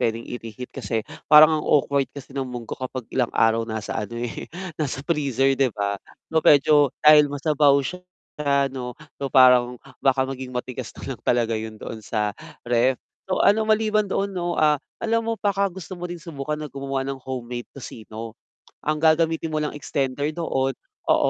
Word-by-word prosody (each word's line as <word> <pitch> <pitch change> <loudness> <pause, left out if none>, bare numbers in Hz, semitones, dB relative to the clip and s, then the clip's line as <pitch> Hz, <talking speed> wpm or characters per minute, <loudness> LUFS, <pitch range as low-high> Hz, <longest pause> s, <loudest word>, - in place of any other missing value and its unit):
pwedeng 115 0 -1
i-reheat, 120 0 -8
kasi 110 -3 -3 0.2
parang 155 +1 +8
ang - - -8
awkward 140 -1 +2
kasi 140 -1 -10
ng 135 -1 -3
munggo 120 -2 -7
kapag 130 -1 -5
ilang 125 -3 +1
araw 115 0 +3
nasa 110 0 -3
ano 115 +3 -6
eh, 120 0 -5 0.3
nasa 135 -2 -2
freezer 135 -5 +1
'di 135 0 +2
ba? 100 -1 -1 0.3
So, 160 - +4
medyo 150 0 +5 0.3
dahil 150 -1 +8
masabaw 145 0 +3
siya 180 +6 -5 0.4
ano, 135 -4 0 0.2
so 140 - -1
parang 125 -1 +5 0.2
baka 135 -1 +3
maging 130 -1 -6
matigas 125 0 -5
na - - -5
lang - - -18
talaga 120 -2 +2
yun 110 0 -6
doon 110 +1 -7
sa 105 0 -1 0.3
ref. 120 +2 +2 0.3
So 185 - +1
ano, 215 +2 +4
maliban 215 -1 +2
doon 195 +1 -1
'no, 175 -2 -2
ah, 150 -2 +3 0.2
alam 230 0 +2
mo 230 - 0
baka 200 -2 +1
gusto 190 0 -10
mo 175 - -4
din 175 - -5
subukan 150 -3 -5
na 150 -1 -7
gumawa 135 -1 -3
ng 135 0 -5
homemade 125 -2 -6
tocino? 115 -3 -8 0.5
Ang 155 0 0
gagamitin 160 +1 +2
mo 155 -1 -2
lang 150 - -2
extender 140 -1 -2
doon, 135 -6 -1 0.3
oo, - - +4
135 Hz, 175 wpm, -23 LUFS, 125-155 Hz, 0.5 s, parang